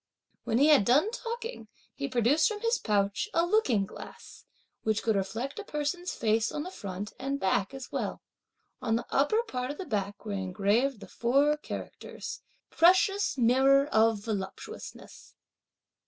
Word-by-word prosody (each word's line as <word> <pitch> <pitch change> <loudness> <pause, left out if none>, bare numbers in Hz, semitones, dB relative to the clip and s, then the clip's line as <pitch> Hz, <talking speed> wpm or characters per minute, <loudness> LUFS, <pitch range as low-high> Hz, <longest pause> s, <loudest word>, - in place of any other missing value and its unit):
When 225 - +1
he 285 +4 +5
had 295 -9 +6
done 290 - +3
talking, 470 0 -6 0.3
he 280 -1 -4
produced 255 +4 +3
from 420 -1 -4
his 460 +1 +1
pouch 205 - 0
a 335 +1 +4
looking 315 - +2
glass - - -12 0.4
which 220 -1 0
could 220 -2 +2
reflect 225 - -3
a - - -5
person's 325 +2 -3
face 220 0 +1
on 295 - -3
the 365 - -7
front 200 - -6
and 275 +1 -2
back 195 0 +1
as 265 -2 -9
well. - - -3 0.6
On 225 -2 +1
the 230 - -2
upper 430 +12 +2
part 255 - -4
of 290 - -5
the 380 - -5
back 205 - -3
were 210 - -4
engraved 200 +6 0
the - - -9
four 280 +5 +2
characters: 300 - -7 0.3
"Precious 375 0 +4
Mirror 265 +3 +4
of 220 -3 +3
Voluptuousness." 200 -4 -7
260 Hz, 155 wpm, -29 LUFS, 215-310 Hz, 0.6 s, had